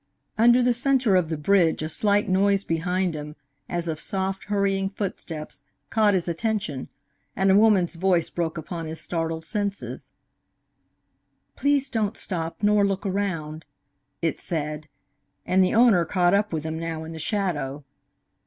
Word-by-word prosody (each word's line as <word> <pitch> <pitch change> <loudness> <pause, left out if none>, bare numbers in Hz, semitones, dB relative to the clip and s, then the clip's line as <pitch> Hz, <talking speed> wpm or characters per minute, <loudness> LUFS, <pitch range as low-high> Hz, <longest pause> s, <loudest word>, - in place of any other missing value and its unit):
Under 240 +3 +5
the 245 0 +3
centre 255 -4 +2
of 180 -4 +2
the 160 - -2
bridge 165 0 +2
a - - -1
slight 205 +5 +1
noise 195 +1 +2
behind 180 +2 -1
him, 150 0 -7 0.3
as 175 -1 -2
of 155 -2 -3
soft, 190 +1 -3
hurrying 195 -1 0
footsteps, 180 -6 -6 0.3
caught 215 -3 +3
his 180 -2 -1
attention, 170 - -2 0.5
and 195 0 +3
a - - +5
woman's 205 -5 +4
voice 175 -1 +1
broke 170 -1 -2
upon 165 +1 -5
his 160 +1 -5
startled 165 -1 -3
senses. 205 +1 -4 1.4
"Please 285 -1 +1
don't 220 -4 -1
stop, 165 0 -3
nor 205 0 +4
look 195 0 -1
around," 165 -6 -2 0.6
it 165 - 0
said, 155 -2 -3 0.6
and 185 +1 +3
the 185 - +1
owner 225 -7 +5
caught 175 +1 +2
up 205 +1 +2
with 160 -3 -2
him 160 0 -4
now 165 -1 -4
in 160 - -8
the 160 - -7
shadow. 155 -7 -2
185 Hz, 155 wpm, -25 LUFS, 160-205 Hz, 1.4 s, Under